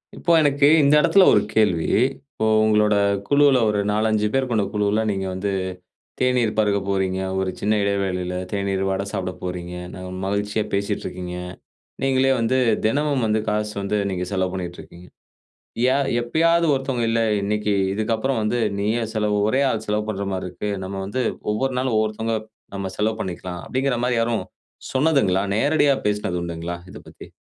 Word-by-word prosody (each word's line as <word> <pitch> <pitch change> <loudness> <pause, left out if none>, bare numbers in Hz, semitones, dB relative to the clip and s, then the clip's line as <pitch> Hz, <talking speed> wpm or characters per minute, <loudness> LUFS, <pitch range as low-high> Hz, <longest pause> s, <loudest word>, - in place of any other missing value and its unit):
இப்போ, 170 - -1
எனக்கு 145 -1 +3
இந்த 140 +1 +4
இடத்துல 195 +4 +5
ஒரு 105 - +5
கேள்வி. 100 -7 +2 0.5
இப்போ 110 - -2 0.2
உங்களோட 105 -1 +3 0.3
குழுவுல 140 -2 +5
ஒரு 105 -1 0
4,5 110 0 +1
பேர் 135 -1 +1
கொண்ட 110 -3 +1
குழுவுல, 105 +1 +1
நீங்க 95 -1 -2
வந்து 95 +2 -2 0.7
தேநீர் 125 -4 +1
பருக 105 -1 +2
போறீங்க. 95 -1 0 0.2
ஒரு 95 -1 -1
சின்ன 105 +1 +1
இடைவேளயில 95 -3 -1 0.2
தேநீர், 100 -1 -1
வடை 95 +1 -1
சாப்பிட 95 0 -3
போறீங்க, 90 -1 -5 0.2
ந - - -9 0.3
மகிழ்ச்சியா 105 +2 -1
பேசீட்டு 100 0 -1
இருக்கீங்க. 90 -1 -5 0.7
நீங்களே 135 0 +3
வந்து 115 +3 +1 0.3
தினமும் 140 +2 +1
வந்து 110 0 +1
காசு 105 0 -1
வந்து 100 +1 -1
நீங்க 90 -1 -2
செலவு 95 -1 0
பண்ணிட்டு 90 -2 -5
இருக்கீங்க. 90 +1 -15 0.8
யா 130 +1 +3 0.2
எப்பயாவது 165 +7 +2
ஒருத்தவங்க, 130 -3 -1
இல்ல 115 0 +1 0.2
இன்னைக்கு 105 0 0 0.2
இதுக்கப்புறம் 110 +3 -1
வந்து 105 +3 0 0.2
நீயே 110 +3 0
செலவு, 105 -1 +1
ஒரே 130 +5 +2
ஆள் 110 - -2
செலவு 105 0 -1
பண்ற 100 -1 -3
மாரி 95 -1 -3
இருக்கு. 105 - -4
நம்ம 95 +1 -5
வந்து 125 +6 -2 0.3
ஒவ்வொரு 130 +4 -1
நாள் 130 -3 -1
ஒவ்வொருத்தவங்க 110 +1 0 0.4
நம்ம 100 -1 -3
செலவு 110 +1 +1
பண்ணிக்கலாம். 90 -1 -5
அப்படிங்கிற 130 -1 0
மாரி 125 -2 +1
யாரும் 115 0 0 0.5
சொன்னதுங்களா, 130 - +2
நேரடியா 145 +3 +3
பேசினது 105 -4 -1
உண்டுங்களா 85 0 -5
இதை - - -10
பத்தி? - - -12
105 Hz, 160 wpm, -22 LUFS, 95-125 Hz, 0.8 s, இடத்துல